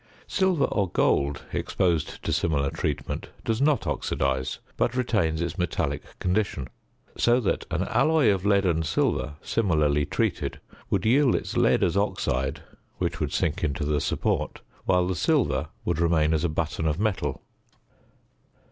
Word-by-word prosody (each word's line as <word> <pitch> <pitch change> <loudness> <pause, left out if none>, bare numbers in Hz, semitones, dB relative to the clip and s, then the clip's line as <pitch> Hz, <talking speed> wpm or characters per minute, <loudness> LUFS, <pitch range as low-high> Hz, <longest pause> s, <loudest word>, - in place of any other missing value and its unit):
Silver 190 -6 +2
or 100 -4 0
gold 70 -3 +1
exposed 85 -5 -1
to - - -1
similar 70 -4 +1
treatment - - -3 0.2
does 115 +2 0
not 145 -1 +3
oxidise, 65 -1 -1 0.2
but 120 - 0
retains 100 -11 +1
its 85 -1 -3
metallic 75 -4 -1 0.2
condition; 90 -8 -1 0.5
so 120 +1 +3
that 115 - -1
an - - 0
alloy 155 -8 +3
of 95 -2 -3
lead 100 -1 +3
and 80 -2 +1
silver 75 -1 0
similarly 75 -9 +2
treated - - -1 0.3
would 95 -1 0
yield 130 +3 +4
its - - -3
lead - - +3
as 85 - +1
oxide, 70 -9 -1 0.3
which - - -2
would - - -1
sink 80 0 -1
into 75 -1 -1
the 75 -1 +1
support, - - -1 0.2
while 90 -1 +3
the 95 - 0
silver 75 - +1 0.2
would 85 -2 0
remain 80 -2 +3
as 80 0 +1
a 85 - +1
button 80 +1 -1
of 75 +2 0
metal. 95 -10 -1
85 Hz, 150 wpm, -26 LUFS, 75-105 Hz, 0.5 s, yield